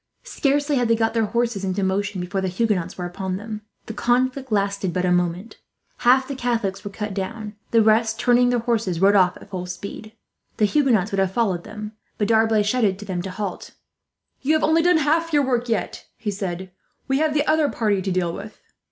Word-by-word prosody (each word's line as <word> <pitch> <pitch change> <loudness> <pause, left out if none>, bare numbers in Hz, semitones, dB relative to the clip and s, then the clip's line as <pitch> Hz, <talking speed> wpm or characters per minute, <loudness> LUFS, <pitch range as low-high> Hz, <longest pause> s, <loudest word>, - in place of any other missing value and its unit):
Scarcely 290 - 0
had 245 -1 +2
they 230 - +4
got 225 0 0
their 225 -2 +1
horses 235 -3 -1
into 190 +1 -1
motion 195 0 -1
before 190 +2 -2
the 190 - -1
Huguenots 185 -2 -1
were 180 - -4
upon 185 +1 -4
them. 215 +1 -6 0.2
The 225 - -6
conflict 255 +2 0
lasted 200 -3 0
but 180 0 0
a 180 - +2
minute. 180 +4 -1 0.4
Half 260 +2 +4
the 280 - -4
Catholics 230 -6 -2
were 205 - -5
cut 210 0 -5
down; 210 +2 -5 0.2
the 230 -1 +4
rest, 220 +1 +3
turning 245 +1 +4
their 245 - +2
horses, 225 -7 -1
rode 195 +2 +5
off 185 -3 +4
at - - -14
full 180 -2 -4
speed. 200 +4 -7 0.4
The 215 - +4
Huguenots 225 -5 +2
would 195 - -1
have 190 -1 +1
followed 190 -6 0
them, 210 0 -7 0.3
but 205 - 0
D'Arblay 220 -1 +4
shouted 205 -3 +1
to 210 - -9
them 185 -3 -3
to 190 - -5
halt. 190 0 -5 0.7
"You 290 +4 +2
have 315 - +1
only 320 +1 +4
done 350 0 +4
half 320 +2 +1
your 290 -2 +4
work 245 -2 0
yet," 220 -5 -2
he 210 - -3
said. 190 -2 -5 0.4
"We 270 0 +1
have 310 -1 +1
the 295 0 +2
other 310 -2 +3
party 205 -4 0
to 190 0 -2
deal 175 -2 0
with." 205 +3 -9
215 Hz, 210 wpm, -22 LUFS, 190-245 Hz, 0.7 s, rode